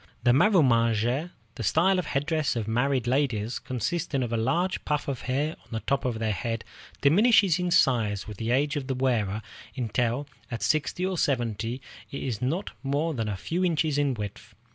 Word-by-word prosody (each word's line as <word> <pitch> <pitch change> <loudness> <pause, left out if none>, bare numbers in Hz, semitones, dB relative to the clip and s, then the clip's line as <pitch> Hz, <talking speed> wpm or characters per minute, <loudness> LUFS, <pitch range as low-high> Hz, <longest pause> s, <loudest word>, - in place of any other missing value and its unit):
The 120 - +5
marumagé, 125 - +3 0.2
the 125 - -7
style 180 - +3
of 175 - -3
headdress 145 +1 0
of 110 -3 -2
married 125 +2 +1
ladies, 120 -4 0
consisting 135 - -2
of 120 -1 -3
a - - +2
large 165 +12 0
puff 150 0 -1
of 135 -3 -3
hair 145 +4 +1
on - - -25
the 110 -1 -4
top 140 -1 -1
of 120 -3 -1
the 110 -1 0
head, 115 +3 -3 0.4
diminishes 195 +3 +5
in 180 0 0
size 110 - +2
with 105 -2 -8
the 115 +2 -3
age 145 +5 +2
of 140 -3 -3
the 135 - -1
wearer 110 -5 0 0.3
until, 120 +2 -1 0.2
at 115 -3 -4
sixty 155 +4 0
or 185 -2 -1
seventy, 120 -2 -1 0.3
it 140 - -5
is 120 -4 -3
not 160 +10 -1
more 145 +4 0
than 115 -5 -2
a 100 - -3
few 175 - -2
inches 160 -4 +1
in 140 -3 +1
width. 105 -2 -7
130 Hz, 185 wpm, -27 LUFS, 115-155 Hz, 0.4 s, The